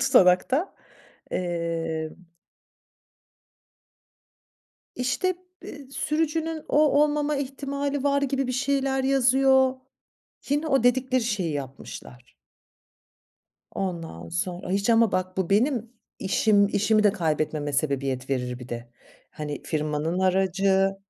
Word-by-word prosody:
tutanakta. 260 Hz, -, +4 dB, 0.6 s
Emm 165 Hz, -1 st, -3 dB, 2.7 s
İşte 260 Hz, +9 st, 0 dB, 0.3 s
be 280 Hz, -3 st, -10 dB
sürücünün 315 Hz, +2 st, -1 dB
o 295 Hz, -, +2 dB, 0.2 s
olmama 295 Hz, 0 st, +1 dB
ihtimali 280 Hz, +1 st, -3 dB
var 280 Hz, 0 st, +2 dB
gibi 275 Hz, -1 st, 0 dB
bir 255 Hz, -, -2 dB
şeyler 270 Hz, 0 st, 0 dB
yazıyor. 265 Hz, 0 st, +4 dB, 0.7 s
Yine 290 Hz, +3 st, 0 dB
o 270 Hz, -5 st, +2 dB
dedikleri 255 Hz, +1 st, +2 dB
şeyi 205 Hz, -8 st, -1 dB
yapmışlar. 130 Hz, -3 st, -8 dB, 1.4 s
Ondan 165 Hz, -, -4 dB
sonra, 175 Hz, -, -3 dB
hiç 200 Hz, +4 st, +1 dB
ama 230 Hz, -2 st, +4 dB
bak 185 Hz, 0 st, -2 dB
bu 190 Hz, -2 st, -1 dB
benim 235 Hz, +2 st, +1 dB, 0.3 s
işim 200 Hz, +1 st, +3 dB
işimi 215 Hz, +1 st, +2 dB
de 205 Hz, -, +5 dB
kaybetmeme 155 Hz, -5 st, -1 dB
sebebiyet 135 Hz, -2 st, -1 dB
verir 125 Hz, -2 st, -2 dB
bir 125 Hz, 0 st, -10 dB
de. 120 Hz, -1 st, -6 dB, 0.4 s
Hani 150 Hz, -1 st, -6 dB
firmanın 155 Hz, +2 st, -2 dB
aracı. 190 Hz, +1 st, +2 dB
200 Hz, 100 wpm, -25 LUFS, 165-270 Hz, 2.7 s, de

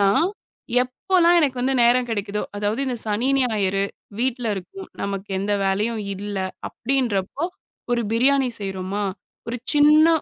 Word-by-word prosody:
நான் 200 Hz, -, +4 dB, 0.6 s
எப்போல்லாம் 345 Hz, +7 st, +3 dB
எனக்கு 280 Hz, -6 st, +2 dB
வந்து 265 Hz, +1 st, +1 dB
நேரம் 245 Hz, +1 st, +4 dB
கிடைக்குதோ 205 Hz, -1 st, -2 dB
அதாவது 210 Hz, +5 st, -1 dB
இந்த 250 Hz, -2 st, -1 dB
சனி, 215 Hz, +5 st, 0 dB
ஞாயிறு 200 Hz, -6 st, +1 dB, 0.3 s
வீட்டுல 245 Hz, -2 st, 0 dB
இருக்கும் 365 Hz, -, -8 dB
நமக்கு 200 Hz, 0 st, -4 dB
எந்த 200 Hz, +2 st, -1 dB
வேலையும் 210 Hz, +4 st, 0 dB
இல்ல 205 Hz, +1 st, -5 dB, 0.3 s
அப்டின்றப்போ, 250 Hz, -, -1 dB, 0.5 s
ஒரு 240 Hz, -1 st, +2 dB
பிரியாணி 265 Hz, +2 st, +3 dB
செய்றோமா 195 Hz, +1 st, -3 dB, 0.5 s
ஒரு 245 Hz, -, -2 dB, 0.2 s
சின்ன 300 Hz, +2 st, +6 dB
230 Hz, 130 wpm, -23 LUFS, 200-265 Hz, 0.6 s, சின்ன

